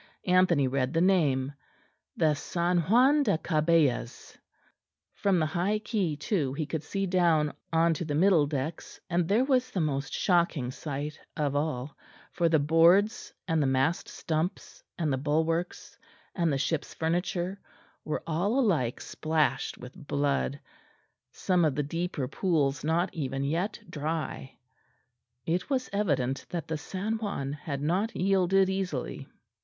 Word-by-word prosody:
Anthony 180 Hz, -6 st, +4 dB
read 130 Hz, +1 st, -1 dB
the 165 Hz, -, +2 dB
name, 145 Hz, -8 st, +2 dB, 0.6 s
the 155 Hz, -3 st, +3 dB
San 175 Hz, +4 st, 0 dB
Juan 250 Hz, -, +4 dB
da 205 Hz, -, +2 dB
Cabellas. 155 Hz, -7 st, 0 dB, 0.8 s
From 200 Hz, -3 st, +1 dB
the 160 Hz, -, +2 dB
high 180 Hz, +6 st, 0 dB
quay 210 Hz, -7 st, -1 dB
too 150 Hz, -, -1 dB
he 155 Hz, +2 st, -2 dB
could 160 Hz, 0 st, -3 dB
see 195 Hz, +6 st, -2 dB
down 170 Hz, -5 st, +2 dB, 0.2 s
on 165 Hz, 0 st, +3 dB
to 160 Hz, -, -3 dB
the 150 Hz, -3 st, -3 dB
middle 165 Hz, -3 st, +4 dB
decks, 145 Hz, +2 st, -4 dB
and 170 Hz, -1 st, +1 dB
there 225 Hz, +7 st, +3 dB
was 255 Hz, -2 st, +2 dB
the 200 Hz, -, -3 dB
most 145 Hz, -3 st, -1 dB
shocking 170 Hz, -8 st, +1 dB
sight 145 Hz, +2 st, -5 dB, 0.2 s
of 145 Hz, -2 st, 0 dB
all, 145 Hz, -2 st, -2 dB, 0.4 s
for 170 Hz, -2 st, +1 dB
the 160 Hz, -, +4 dB
boards 170 Hz, +9 st, +3 dB, 0.2 s
and 165 Hz, -2 st, +1 dB
the 140 Hz, -, +2 dB
mast 135 Hz, +5 st, +1 dB
stumps 160 Hz, +2 st, -3 dB
and 155 Hz, -5 st, 0 dB
the 130 Hz, -, -1 dB
bulwarks 160 Hz, +4 st, -1 dB, 0.3 s
and 170 Hz, -4 st, +1 dB
the 140 Hz, -, +1 dB
ship's 145 Hz, +3 st, -2 dB
furniture 175 Hz, +3 st, -1 dB, 0.4 s
were 155 Hz, -, -3 dB
all 185 Hz, +10 st, 0 dB
alike 160 Hz, -, +1 dB
splashed 155 Hz, -1 st, -1 dB
with 125 Hz, +2 st, -10 dB
blood, 140 Hz, -1 st, 0 dB, 0.7 s
some 180 Hz, -2 st, +1 dB
of 150 Hz, -4 st, +2 dB
the 150 Hz, -, 0 dB
deeper 165 Hz, -2 st, -3 dB
pools 150 Hz, -4 st, 0 dB
not 170 Hz, +4 st, 0 dB
even 135 Hz, -3 st, -3 dB
yet 170 Hz, +9 st, -1 dB
dry. 155 Hz, -4 st, -4 dB, 0.9 s
It 175 Hz, +2 st, -1 dB
was 260 Hz, -2 st, -1 dB
evident 140 Hz, -10 st, 0 dB
that 170 Hz, -4 st, -4 dB
the 160 Hz, -, -2 dB
San 205 Hz, +8 st, -3 dB
Juan 145 Hz, -11 st, -3 dB
had 145 Hz, -2 st, -5 dB
not 190 Hz, +9 st, 0 dB
yielded 195 Hz, 0 st, +3 dB
easily. 190 Hz, -9 st, -3 dB
165 Hz, 145 wpm, -28 LUFS, 145-185 Hz, 0.9 s, Anthony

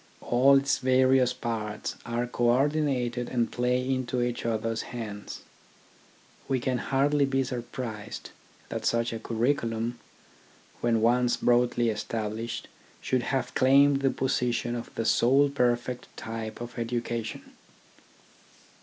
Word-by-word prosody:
All 135 Hz, +3 st, +5 dB
its 135 Hz, 0 st, +1 dB
various 130 Hz, -1 st, +4 dB
parts 110 Hz, -4 st, -4 dB
are 120 Hz, +1 st, -1 dB
co 120 Hz, 0 st, -2 dB
ordinated 125 Hz, -2 st, +1 dB
and 120 Hz, -2 st, 0 dB
play 125 Hz, +1 st, 0 dB
into 130 Hz, -1 st, -1 dB
each 120 Hz, -1 st, -1 dB
other's 115 Hz, 0 st, -1 dB
hands. 105 Hz, -4 st, -7 dB, 1.1 s
We 130 Hz, -1 st, +1 dB
can 125 Hz, 0 st, -1 dB
hardly 140 Hz, +3 st, +2 dB
be 135 Hz, 0 st, +1 dB
surprised 120 Hz, -3 st, -6 dB, 0.4 s
that -, -, -4 dB
such 115 Hz, 0 st, +1 dB
a 115 Hz, -, -4 dB
curriculum, 115 Hz, 0 st, -1 dB, 0.8 s
when 115 Hz, -2 st, +1 dB
once 120 Hz, +1 st, +3 dB
broadly 120 Hz, -1 st, +2 dB
established, 110 Hz, +1 st, -3 dB, 0.3 s
should 130 Hz, -1 st, 0 dB
have 125 Hz, 0 st, -2 dB
claimed 140 Hz, +1 st, +5 dB
the 135 Hz, -, +3 dB
position 125 Hz, -2 st, 0 dB
of 120 Hz, -1 st, -5 dB
the 115 Hz, -, -2 dB
sole 135 Hz, +6 st, +4 dB
perfect 125 Hz, -2 st, 0 dB
type 110 Hz, 0 st, -6 dB
of 120 Hz, 0 st, -7 dB
education. 115 Hz, -1 st, -3 dB
120 Hz, 120 wpm, -28 LUFS, 115-130 Hz, 1.1 s, All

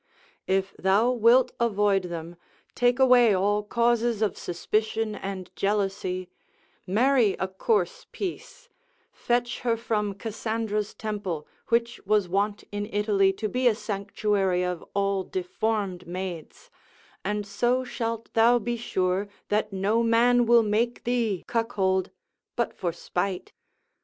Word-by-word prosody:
If 190 Hz, 0 st, 0 dB
thou 200 Hz, +6 st, +3 dB
wilt 245 Hz, +1 st, +4 dB
avoid 205 Hz, -4 st, +2 dB
them, 170 Hz, -1 st, -6 dB, 0.4 s
take 245 Hz, 0 st, +2 dB
away 250 Hz, -5 st, +6 dB
all 205 Hz, +2 st, +2 dB
causes 235 Hz, +1 st, +1 dB
of 210 Hz, -, 0 dB
suspicion 215 Hz, +5 st, -1 dB
and 195 Hz, -2 st, -6 dB
jealousy, 195 Hz, -2 st, -1 dB, 0.6 s
marry 230 Hz, +1 st, +3 dB
a 190 Hz, -, -2 dB
coarse 450 Hz, -, -1 dB
piece, 485 Hz, +6 st, -6 dB, 0.4 s
fetch 240 Hz, 0 st, -1 dB
her 235 Hz, -2 st, 0 dB
from 210 Hz, -3 st, -1 dB
Cassandra's 220 Hz, -1 st, -3 dB
temple, 200 Hz, -8 st, -4 dB, 0.2 s
which 235 Hz, +1 st, 0 dB
was 210 Hz, -1 st, +2 dB
wont 200 Hz, +3 st, -1 dB
in 205 Hz, 0 st, -3 dB
Italy 205 Hz, -2 st, +3 dB
to 215 Hz, +3 st, -3 dB
be 250 Hz, +3 st, +1 dB
a 230 Hz, -, +4 dB
sanctuary 200 Hz, -3 st, -1 dB
of 180 Hz, -2 st, -3 dB
all 200 Hz, -1 st, +1 dB
deformed 185 Hz, 0 st, -2 dB
maids, 180 Hz, -2 st, -7 dB, 0.5 s
and 210 Hz, +1 st, -2 dB
so 240 Hz, +6 st, +1 dB
shalt 230 Hz, -2 st, -4 dB
thou 230 Hz, +2 st, +5 dB
be 240 Hz, +1 st, -2 dB
sure 190 Hz, -3 st, -1 dB, 0.2 s
that 210 Hz, 0 st, 0 dB
no 200 Hz, +4 st, +1 dB
man 235 Hz, +1 st, +4 dB
will 235 Hz, -1 st, +6 dB
make 225 Hz, +3 st, 0 dB
thee 230 Hz, -6 st, 0 dB
cuckold, 195 Hz, -5 st, 0 dB, 0.5 s
but 235 Hz, -, -1 dB
for 175 Hz, -, -2 dB
spite. 180 Hz, +2 st, -3 dB
210 Hz, 125 wpm, -26 LUFS, 195-235 Hz, 0.6 s, away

